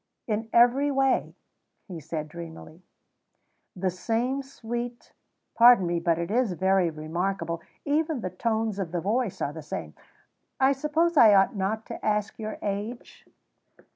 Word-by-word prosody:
"In 220 0 -2
every 245 +5 +4
way," 270 -1 +1 0.5
he 180 -5 -7
said 155 0 -5
dreamily; 165 0 -10 0.9
"the 185 0 -1
same 235 +8 -1
sweet 240 -2 -6 0.4
pardon 235 -4 +7
me, 170 0 0
but 170 -1 +1
it 170 +3 -3
is 235 -4 +1
very 190 0 +2
remarkable. 170 +2 -3 0.2
Even 300 -1 0
the 185 - -4
tones 220 +1 -1
of 180 -4 -3
the 175 - 0
voice 215 +3 -1
are 145 - -2
the 160 - -7
same. 150 - -6 0.7
I 265 0 +5
suppose 305 +4 0
I 220 -5 +8
ought 195 +4 +4
not 205 +3 -2
to - - -8
ask 210 +1 -1
your 215 0 -5
age?" 210 +4 -5
210 Hz, 145 wpm, -26 LUFS, 175-245 Hz, 0.9 s, I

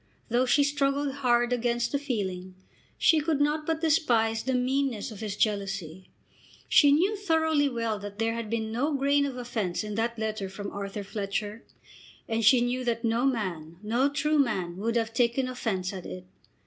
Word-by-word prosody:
Though 245 +2 +2
she 285 +3 +4
struggled 280 0 0
hard 240 -2 +2
against 240 0 0
the 280 - 0
feeling, 190 -9 -4 0.4
she 320 - +4
could 305 -1 0
not 300 +1 +1
but 320 -1 -1
despise 235 -9 +2
the 260 0 -1
meanness 255 -3 0
of 210 - -9
his 210 -2 -4
jealousy. 195 -5 -2 0.6
She 290 -2 +6
knew 365 +9 +3
thoroughly 320 -7 +2
well 230 -4 -2
that 205 0 -8
there 225 +1 0
had 230 -2 -4
been 220 -1 -2
no 280 +6 0
grain 280 +1 +2
of 260 -2 -6
offence 225 -7 -2
in 210 0 -5
that 230 +2 -1
letter 215 -3 -3
from 200 +1 -6
Arthur 200 +1 -5
Fletcher, 205 +2 -4 0.6
and 225 0 -1
she 240 +3 +6
knew 245 +1 -1
that 235 -1 -1
no 230 +3 +1
man, 175 -10 -3
no 240 +6 +2
true 300 +2 +1
man, 190 -10 0
would 230 +4 -1
have 225 -1 0
taken 240 +2 +1
offence 205 -7 -2
at 185 -2 -7
it. 90 0 -8
235 Hz, 180 wpm, -27 LUFS, 210-275 Hz, 0.6 s, She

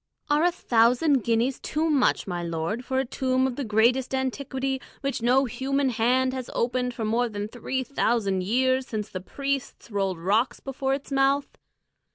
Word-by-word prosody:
"Are 295 +2 +4
a 355 - +4
thousand 250 -1 +3
guineas 235 +4 +1
too 315 +1 -1
much, 290 -5 +2
my 175 -2 -3
lord, 170 +7 -3
for 260 +1 -2
a 265 - +1
tomb 260 +1 0
of 260 -2 -1
the 280 - -3
greatest 240 +4 +2
antiquity, 265 0 -2 0.2
which 275 -3 -2
no 255 +3 +4
human 265 +3 0
hand 255 +2 +2
has 260 -2 -5
opened 250 +1 0
for 225 - -3
more 235 +3 +1
than 205 -1 -4
three 255 +3 -3
thousand 225 -7 0
years, 255 +6 +1
since 215 -2 -4
the 185 - -6
priests 275 +3 -4
rolled 195 -3 -1
rocks 205 +9 +1
before 270 0 -2
its 280 +1 -9
mouth? 275 +1 +1
255 Hz, 175 wpm, -26 LUFS, 225-270 Hz, 0.2 s, Are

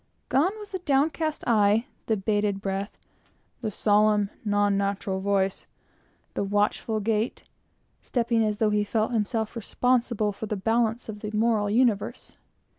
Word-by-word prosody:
Gone 335 +11 +2
was 420 -1 -10
the 375 - -3
downcast 310 0 0
eye, 215 0 +3 0.2
the 220 - +2
bated 205 0 0
breath, 195 +1 -4 0.6
the 225 - -1
solemn, 210 0 +2
non 205 -1 +2
natural 200 -1 -1
voice, 195 -1 0 0.7
the - - -1
watchful 205 +2 0
gait, 220 +2 -1 0.6
stepping 235 -2 +1
as 210 -1 -1
if 215 -1 +3
he 210 0 +2
felt 220 +3 -1 0.4
responsible 235 -1 +1
for 215 +2 -6
the 210 - -2
balance 225 +3 0
of 215 -2 -6
the 210 - -4
moral 215 -2 +2
universe! 225 -2 0
215 Hz, 135 wpm, -26 LUFS, 205-235 Hz, 0.7 s, eye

